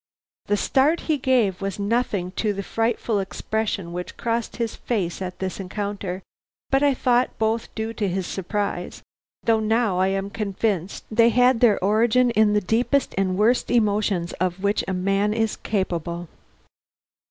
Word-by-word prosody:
The 205 Hz, -, +2 dB
start 285 Hz, +9 st, +2 dB
he 310 Hz, -3 st, 0 dB
gave 245 Hz, -9 st, +2 dB
was 195 Hz, -2 st, -3 dB
nothing 205 Hz, -3 st, -1 dB
to 210 Hz, +2 st, -1 dB
the 200 Hz, 0 st, -4 dB
frightful 225 Hz, 0 st, 0 dB
expression 195 Hz, -2 st, -3 dB
which 180 Hz, 0 st, -6 dB
crossed 230 Hz, -1 st, -2 dB
his 230 Hz, -2 st, -2 dB
face 195 Hz, -7 st, -2 dB
at 180 Hz, -1 st, -5 dB
this 190 Hz, 0 st, -4 dB
encounter, 195 Hz, -1 st, -4 dB, 0.5 s
but 270 Hz, 0 st, +3 dB
I 285 Hz, -2 st, +3 dB
thought 250 Hz, 0 st, +1 dB
both 225 Hz, +1 st, 0 dB
due 220 Hz, 0 st, -3 dB
to 210 Hz, -3 st, -1 dB
his 185 Hz, 0 st, -2 dB
surprise, 195 Hz, -1 st, -3 dB, 0.4 s
though 225 Hz, -1 st, +3 dB
now 220 Hz, -3 st, +1 dB
I 190 Hz, -, +3 dB
am 195 Hz, +1 st, -2 dB
convinced 200 Hz, -3 st, -2 dB
they 230 Hz, +1 st, +5 dB
had 250 Hz, +1 st, +4 dB
their 225 Hz, -4 st, +5 dB
origin 235 Hz, +4 st, +3 dB
in 215 Hz, -2 st, +3 dB
the 210 Hz, -, +3 dB
deepest 240 Hz, +8 st, +1 dB
and 185 Hz, -1 st, 0 dB
worst 230 Hz, +4 st, +2 dB
emotions 205 Hz, -6 st, +1 dB
of 185 Hz, +1 st, -1 dB
which 200 Hz, +1 st, +1 dB
a 190 Hz, -, -1 dB
man 195 Hz, +3 st, +1 dB
is 225 Hz, -1 st, 0 dB
capable. 175 Hz, -4 st, -2 dB
210 Hz, 160 wpm, -23 LUFS, 190-230 Hz, 0.5 s, they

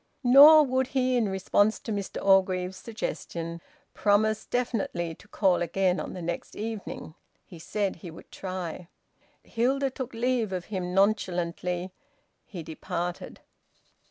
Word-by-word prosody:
Nor 290 Hz, +5 st, +9 dB
would 260 Hz, -1 st, 0 dB
he, 255 Hz, -1 st, +1 dB
in 230 Hz, -4 st, +1 dB
response 205 Hz, +3 st, +1 dB
to 225 Hz, -, -6 dB
Mr 200 Hz, -2 st, -4 dB
Orgreave's 185 Hz, -1 st, +3 dB
suggestion, 170 Hz, -5 st, -5 dB, 0.3 s
promise 215 Hz, +1 st, +2 dB
definitely 205 Hz, -9 st, -2 dB
to 200 Hz, -, -18 dB
call 190 Hz, -4 st, +2 dB
again 180 Hz, +2 st, +1 dB
on -, -, -5 dB
the 180 Hz, -, -7 dB
next 170 Hz, +1 st, -5 dB
evening. 215 Hz, -7 st, -6 dB, 0.3 s
He 170 Hz, -, -13 dB
said 200 Hz, +3 st, -2 dB
he 170 Hz, +1 st, -9 dB
would 160 Hz, -, -13 dB
try. 185 Hz, -2 st, -6 dB, 0.6 s
Hilda 265 Hz, +4 st, 0 dB
took 255 Hz, -2 st, -6 dB
leave 235 Hz, -3 st, 0 dB
of 180 Hz, -2 st, -4 dB
him 180 Hz, -1 st, -3 dB
nonchalantly. 180 Hz, -3 st, 0 dB, 0.6 s
He 175 Hz, -5 st, -7 dB
departed. 175 Hz, +2 st, -5 dB
195 Hz, 130 wpm, -27 LUFS, 180-230 Hz, 0.6 s, Nor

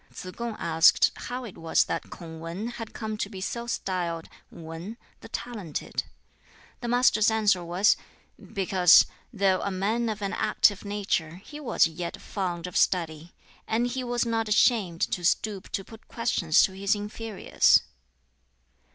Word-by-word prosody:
Tsz 185 Hz, -, -8 dB
kung 235 Hz, -2 st, -4 dB
asked 165 Hz, +1 st, +4 dB, 0.2 s
how 250 Hz, +1 st, -4 dB
it 220 Hz, -6 st, -10 dB
was 165 Hz, 0 st, +3 dB
that -, -, -4 dB
Kung 160 Hz, -2 st, -9 dB
Wan 170 Hz, +8 st, -5 dB
had 225 Hz, -2 st, -7 dB
come 215 Hz, -2 st, -5 dB
to 205 Hz, -, -3 dB
be 195 Hz, -3 st, -8 dB
so 235 Hz, +5 st, -4 dB
styled 175 Hz, -7 st, -3 dB, 0.2 s
Wan 165 Hz, +7 st, -8 dB, 0.2 s
(the -, -, -12 dB
talented). 210 Hz, -10 st, -4 dB, 0.7 s
The 240 Hz, -, -5 dB
Master's 235 Hz, -3 st, +4 dB
answer 210 Hz, -5 st, +2 dB
was, 180 Hz, +5 st, +3 dB, 0.6 s
"Because, 185 Hz, -2 st, +6 dB, 0.3 s
though 195 Hz, -3 st, +2 dB
a -, -, -1 dB
man 215 Hz, +5 st, 0 dB
of 210 Hz, -1 st, -4 dB
an 200 Hz, -, -2 dB
active 205 Hz, -2 st, +2 dB
nature, 200 Hz, -6 st, -2 dB
he 295 Hz, +1 st, -9 dB
was 285 Hz, -, +3 dB
yet 170 Hz, +1 st, -5 dB
fond 180 Hz, -4 st, -4 dB
of 180 Hz, -, -7 dB
study, 165 Hz, -2 st, 0 dB, 0.3 s
and 230 Hz, +2 st, +1 dB
he 255 Hz, +1 st, -3 dB
was 240 Hz, -1 st, 0 dB
not 225 Hz, -1 st, -1 dB
ashamed 205 Hz, -6 st, +3 dB
to 180 Hz, -, -1 dB
stoop 195 Hz, +2 st, 0 dB
to 195 Hz, -, -2 dB
put 225 Hz, +3 st, -15 dB
questions 205 Hz, -9 st, +2 dB
to -, -, +2 dB
his 195 Hz, +2 st, 0 dB
inferiors." 210 Hz, +1 st, +2 dB
200 Hz, 155 wpm, -27 LUFS, 175-225 Hz, 0.7 s, Because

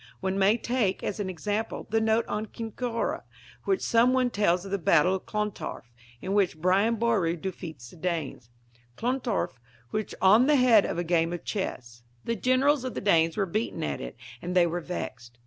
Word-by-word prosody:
One 190 Hz, +1 st, -1 dB
may 200 Hz, +4 st, +4 dB
take, 235 Hz, -5 st, -1 dB
as 205 Hz, -, -3 dB
an 195 Hz, -2 st, -2 dB
example, 205 Hz, +5 st, -3 dB
the 225 Hz, 0 st, +2 dB
note 220 Hz, +1 st, +2 dB
on 210 Hz, +1 st, -3 dB
Kincora, 230 Hz, +2 st, -3 dB, 0.4 s
where 390 Hz, -, +2 dB
some 235 Hz, -2 st, +3 dB
one 255 Hz, -1 st, +2 dB
tells 185 Hz, -4 st, +1 dB
of 195 Hz, -, -8 dB
the 200 Hz, -, 0 dB
Battle 170 Hz, +2 st, +4 dB
of 190 Hz, -, -4 dB
Clontarf, 210 Hz, -, -4 dB, 0.3 s
in 195 Hz, -, -2 dB
which 195 Hz, -5 st, +2 dB
Brian 190 Hz, +7 st, +2 dB
Boru 215 Hz, -7 st, +1 dB
defeated 170 Hz, -5 st, -7 dB
the 175 Hz, -, -14 dB
Danes: 160 Hz, -8 st, -3 dB, 0.5 s
Clontarf 240 Hz, -, -2 dB, 0.3 s
was 215 Hz, -1 st, -3 dB
on 215 Hz, +7 st, +6 dB
the 300 Hz, -, +5 dB
head 245 Hz, -6 st, +5 dB
of -, -, -3 dB
a 175 Hz, -, 0 dB
game 165 Hz, -1 st, +1 dB
of 175 Hz, -, -6 dB
chess. 120 Hz, -, -4 dB, 0.2 s
The 230 Hz, -, 0 dB
generals 255 Hz, +5 st, +2 dB
of 255 Hz, -, -4 dB
the -, -, -1 dB
Danes 165 Hz, -4 st, +3 dB
were 200 Hz, -, +2 dB
beaten 215 Hz, +6 st, -2 dB
at 70 Hz, -2 st, -3 dB
it, -, -, -7 dB, 0.3 s
and 180 Hz, +1 st, -4 dB
they 180 Hz, -1 st, +6 dB
were 175 Hz, +1 st, -2 dB
vexed. 120 Hz, -9 st, -6 dB
195 Hz, 190 wpm, -27 LUFS, 170-230 Hz, 0.5 s, on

